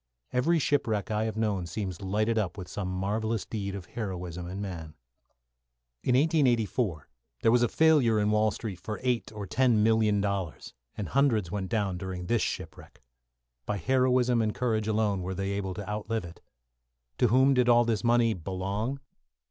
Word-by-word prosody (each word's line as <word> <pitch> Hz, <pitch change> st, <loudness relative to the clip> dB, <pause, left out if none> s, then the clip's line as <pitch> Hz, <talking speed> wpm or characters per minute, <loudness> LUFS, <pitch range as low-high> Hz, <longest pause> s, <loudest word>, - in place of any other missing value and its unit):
Every 140 Hz, +7 st, +3 dB
shipwreck 115 Hz, -9 st, 0 dB
I 110 Hz, +1 st, 0 dB
have 110 Hz, -1 st, -3 dB
known 100 Hz, -5 st, 0 dB
seems 95 Hz, +2 st, -4 dB
lighted 110 Hz, +4 st, 0 dB
up 100 Hz, -3 st, -2 dB
with 95 Hz, -3 st, -7 dB
some 95 Hz, 0 st, -4 dB
marvellous 105 Hz, +3 st, -1 dB
deed 100 Hz, -3 st, -4 dB
of 95 Hz, -3 st, -7 dB
heroism 90 Hz, -6 st, -5 dB
in 95 Hz, +2 st, -6 dB
man. 85 Hz, -6 st, -6 dB, 1.1 s
In 125 Hz, -, +2 dB
1884 120 Hz, -, +1 dB, 0.4 s
there 115 Hz, -, +5 dB
was 120 Hz, 0 st, +4 dB
a 120 Hz, -, +4 dB
failure 140 Hz, -7 st, +4 dB
in 105 Hz, 0 st, +2 dB
Wall 105 Hz, 0 st, +3 dB
Street 100 Hz, -3 st, -6 dB
for 105 Hz, +4 st, -5 dB
eight 125 Hz, -4 st, 0 dB
or 105 Hz, -2 st, -6 dB
ten 120 Hz, +1 st, +3 dB
million 110 Hz, -2 st, +3 dB
dollars, 100 Hz, -4 st, -3 dB, 0.2 s
and 100 Hz, -4 st, -4 dB
hundreds 115 Hz, -10 st, +2 dB
went 95 Hz, -3 st, -3 dB
down 100 Hz, -5 st, -1 dB
during 95 Hz, -1 st, -5 dB
this 115 Hz, +4 st, +1 dB
shipwreck. -, -, -6 dB, 0.6 s
By 105 Hz, -, -1 dB
heroism 125 Hz, 0 st, +2 dB
and 110 Hz, -1 st, -1 dB
courage 110 Hz, -4 st, 0 dB
alone 105 Hz, -3 st, +1 dB
were 95 Hz, +1 st, -4 dB
they 95 Hz, +1 st, -2 dB
able 95 Hz, -2 st, -3 dB
to 100 Hz, 0 st, -6 dB
outlive 105 Hz, 0 st, -3 dB
it. 85 Hz, 0 st, -12 dB, 0.8 s
To 125 Hz, -, +5 dB
whom 130 Hz, +4 st, +4 dB
did 125 Hz, -1 st, +3 dB
all 120 Hz, 0 st, +6 dB
this 115 Hz, -2 st, 0 dB
money 120 Hz, -1 st, +3 dB
belong? 100 Hz, -, -3 dB
105 Hz, 170 wpm, -28 LUFS, 95-120 Hz, 1.1 s, all